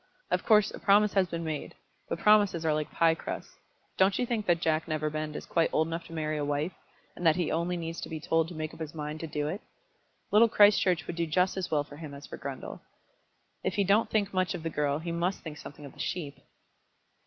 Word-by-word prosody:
Of 180 0 +1
course 215 -2 +5
a - - -8
promise 205 +1 +4
has 195 -2 +3
been 170 -1 -4
made; 155 -2 -4 0.3
but - - -1
promises 205 -4 +4
are 155 - +3
like 150 0 -1
pie 165 -1 +4
crusts. 160 - -7 0.4
Don't 190 +1 +4
you 250 - +1
think 230 -3 -2
that 175 -1 +3
Jack 160 -1 0
Neverbend 155 -1 -2
is - - -6
quite 165 -1 +2
old 160 - +2
enough 165 0 -4
to - - -11
marry 155 -1 -2
a - - -1
wife, 145 +4 -1 0.4
and - - -8
that 160 -2 +5
he 175 -3 0
only 170 +2 0
needs 165 0 -5
be 160 -1 -5
told 165 +1 +1
to 175 - -9
make 155 0 -4
up - - -13
his 160 -1 -6
mind 150 0 -4
to 165 - -5
do 150 -1 -2
it? 185 +7 -4 0.7
Little 225 +3 +6
Christchurch 195 -5 +5
would 170 - -5
do 170 -1 0
just 180 +4 +2
as 190 -2 -3
well 150 -2 +1
for 145 0 -13
him 150 -3 -8
as 140 - -10
for - - -9
Grundle. - - -6 0.8
If - - -1
he 205 - +3
don't 200 +4 +3
think 205 -2 0
much 185 0 +1
of 170 - -7
the 165 - -2
girl 145 -1 0
he 170 +2 -4
must 175 +3 -1
think 150 -2 -7
something 145 +1 -10
of 140 - -10
the - - -19
sheep." 155 -6 -4
165 Hz, 240 wpm, -29 LUFS, 155-185 Hz, 0.8 s, Little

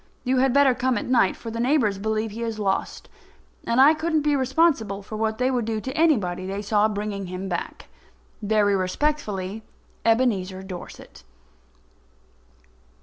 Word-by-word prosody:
You 255 0 +1
had 265 0 +3
better 280 0 +5
come 250 0 0
at - - -3
night, 245 -6 +2
for 230 - -8
the 230 - -5
neighbours 240 -6 +1
believe 220 +1 -2
he 225 +3 -7
is 225 -2 -3
lost, 195 -2 -2 0.6
and 235 +2 +1
I 285 +4 +8
couldn't 315 -1 0
be 295 -1 +2
responsible 260 - +1
for 215 - -8
what 220 0 -1
they 255 +1 +1
would 245 -3 -1
do 220 -1 -2
to 260 +4 -6
anybody 200 - +1
they 200 +2 -4
saw 210 0 +2
bringing 205 -2 -4
him 185 +2 -5
back. 175 -2 -5 0.5
Very 205 -1 +2
respectfully, 200 -1 -2 0.4
EBENEZER 205 -6 +1
DORSET. 185 -2 -10
220 Hz, 155 wpm, -24 LUFS, 200-260 Hz, 0.6 s, I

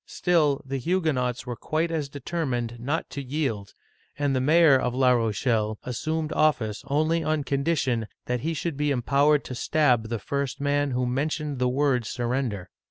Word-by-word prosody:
Still, 155 -6 +1
the 135 0 -3
Huguenots 135 -7 0
were 125 - -4
quite 160 +7 -1
as 155 -4 -2
determined 130 -5 -3
not 140 +7 -2
to 140 - -4
yield, 130 -7 -3 0.4
and 145 -2 0
the 130 - +1
mayor 155 +1 +6
of 125 -2 0
La 130 -1 +4
Rochelle 110 -2 +1
assumed 155 +5 -2
office 125 -9 +1
only 155 +4 +1
on 155 -1 0
condition 135 -5 0 0.2
that 125 0 -1
he 160 +6 -2
should 160 -2 -3
be 150 0 0
empow 140 +2 +2
ered 140 - -14
to - - -7
stab 125 -4 +2
the 115 - -1
first 140 +5 -3
man 145 0 +1
who 125 -1 0
mentioned 145 +2 -2
the 125 0 +2
word 130 -3 +1
sur 120 - -3
render! 120 -6 -2
140 Hz, 175 wpm, -26 LUFS, 125-150 Hz, 0.4 s, mayor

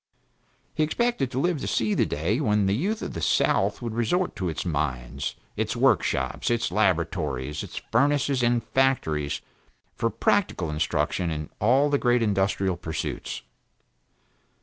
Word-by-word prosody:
He - - -1
expected 195 - +1
to 130 - -2
live 170 0 0
to - - -3
see 110 -2 +1
the - - +2
day, 90 - 0
when 105 -6 +2
the 95 - +2
youth 200 - -1
of - - -5
the 85 - -5
south 80 - +2
would 115 -2 -3
resort 145 +11 0
to 90 -2 -1
its 80 - -4
mines, 70 -4 -2 0.2
its - - -1
workshops, 65 -1 +1
its 120 -1 0
laboratories, 80 -8 0
its - - -8
furnaces 140 +1 +2
and 120 0 +2
factories 80 - 0 0.5
for - - 0
practical 80 - +1
instruction 80 +3 0
in 75 -2 -4
all 135 +7 +3
the 140 - +3
great 120 -1 +3
industrial 95 -3 +1
pursuits. 80 -6 -4
105 Hz, 150 wpm, -26 LUFS, 80-135 Hz, 0.5 s, all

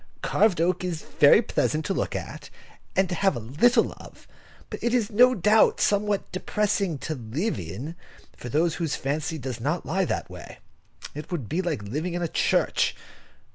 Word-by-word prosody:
Carved 210 -6 +2
oak 180 +2 +1
is 170 -4 -3
very 150 +10 +5
pleasant 155 -6 -1
to 195 - 0
look - - -2
at, - - -6 0.5
and 190 0 +3
to 180 - -4
have 195 -2 +1
a - - -3
little 145 - +2
of, - - -14 0.4
but - - -6
it 240 +1 +1
is 230 -4 0
no 250 +4 +5
doubt 210 +4 +4
somewhat 205 0 +1
depressing 200 -3 -1
to 155 - -4
live 130 - -3
in, 100 - -6 0.4
for 125 - -8
those 160 +6 +1
whose 160 -3 0
fancy 150 +3 -2
does 130 -3 -5
not 150 +8 -2
lie 190 +3 0
that - - -2
way. - - -11 0.6
It 150 +4 -8
would 150 -11 -3
be 170 - -1
like 165 - -3
living 155 - -3
in 175 - -2
a - - 0
church. - - +1
170 Hz, 180 wpm, -25 LUFS, 145-200 Hz, 0.6 s, very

